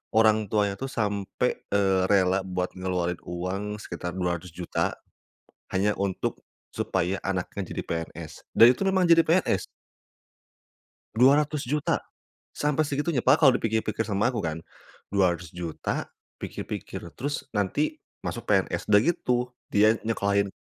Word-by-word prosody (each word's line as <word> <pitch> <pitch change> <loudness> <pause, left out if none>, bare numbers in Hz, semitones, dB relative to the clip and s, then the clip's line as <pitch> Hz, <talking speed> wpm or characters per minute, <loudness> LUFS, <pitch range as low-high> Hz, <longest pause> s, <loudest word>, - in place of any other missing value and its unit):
orang 110 -1 +4
tuanya 105 -2 +1
itu 135 - -3
sampai, 105 +1 -1
eee, 95 -2 +3
rela 95 -1 +3
buat 90 -1 -3
ngeluarin 90 -2 -2
uang 95 +4 -4
sekitar 90 -3 -6
Rp200.000.000 90 -1 -2 0.7
hanya 100 +2 +2
untuk 100 -1 -2 0.3
supaya 95 +1 0
anaknya 95 +1 -2
jadi - - -3
PNS, 80 -1 -5
dan 115 - +10
itu - - -13
memang 190 -1 +3
jadi 165 0 +7
PNS. 175 +4 +2 1.5
Rp200.000.000. 145 +2 +3 0.5
Sampai 150 +1 +1
segitunya 145 -1 -1
padahal 140 +2 +6
kalau - - +7
dipikir 110 0 +1
pikir 110 +1 0
sama 105 +2 +1
aku 115 - -2
kan 80 0 -2 0.6
Rp200.000.000, 85 -3 -1 0.3
pikir-pikir, - - -5 0.2
terus 145 +4 -3
nanti 105 +9 0 0.2
masuk - - -5
PNS, - - +1
udah 105 -1 +7
gitu 125 -4 +1 0.4
dia 110 +2 +5
nyekolahin 100 -3 +1
100 Hz, 120 wpm, -26 LUFS, 90-125 Hz, 1.5 s, dan